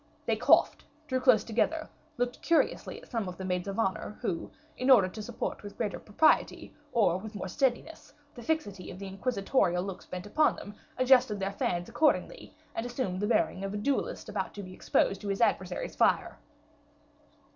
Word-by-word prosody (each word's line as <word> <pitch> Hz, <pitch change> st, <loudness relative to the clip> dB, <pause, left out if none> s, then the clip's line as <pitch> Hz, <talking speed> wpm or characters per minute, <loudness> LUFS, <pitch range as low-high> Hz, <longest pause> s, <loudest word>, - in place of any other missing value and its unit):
They -, -, +2 dB
coughed, -, -, +4 dB, 0.2 s
drew 260 Hz, -3 st, -1 dB
closer 250 Hz, -5 st, +4 dB
together, 310 Hz, +8 st, 0 dB, 0.3 s
looked 245 Hz, 0 st, -2 dB
curiously 335 Hz, -, +1 dB
at -, -, -17 dB
some 225 Hz, -5 st, -1 dB
of 180 Hz, -, -7 dB
the 190 Hz, -, -5 dB
maids 180 Hz, 0 st, -2 dB
of 195 Hz, -, -4 dB
honor, 210 Hz, -1 st, -1 dB
who, 190 Hz, -9 st, -3 dB, 0.3 s
in 255 Hz, +2 st, -1 dB
order 225 Hz, -8 st, +7 dB
to 215 Hz, +4 st, -7 dB
support 210 Hz, -, -4 dB
with 205 Hz, -1 st, -10 dB
greater 210 Hz, -5 st, -2 dB
propriety, 220 Hz, +9 st, +2 dB, 0.2 s
or 200 Hz, -7 st, +3 dB
with 220 Hz, +2 st, -9 dB
more 190 Hz, -, -4 dB
steadiness, 270 Hz, -, -1 dB, 0.2 s
the 245 Hz, -, -10 dB
fixity 225 Hz, -, -2 dB
of 180 Hz, -, -8 dB
the 200 Hz, -, -7 dB
inquisitorial 195 Hz, -2 st, 0 dB
looks 195 Hz, -1 st, -7 dB
bent 180 Hz, 0 st, -6 dB
upon 305 Hz, +9 st, +2 dB
them, 205 Hz, -, -9 dB, 0.2 s
adjusted 255 Hz, -4 st, +4 dB
their 195 Hz, 0 st, -1 dB
fans 175 Hz, -3 st, -1 dB
accordingly, 295 Hz, +7 st, 0 dB, 0.2 s
and 225 Hz, -, -3 dB
assumed 240 Hz, -7 st, -3 dB
the 205 Hz, -, 0 dB
bearing 195 Hz, -4 st, +1 dB
of 195 Hz, +1 st, -3 dB
a -, -, -1 dB
duelist 275 Hz, +7 st, -1 dB
about -, -, -4 dB
to 205 Hz, -, -6 dB
be 185 Hz, 0 st, -9 dB
exposed 195 Hz, +1 st, +1 dB
to 205 Hz, -, -6 dB
his 195 Hz, 0 st, -1 dB
adversary's 370 Hz, -, 0 dB
fire. -, -, +2 dB
210 Hz, 185 wpm, -30 LUFS, 190-255 Hz, 0.3 s, order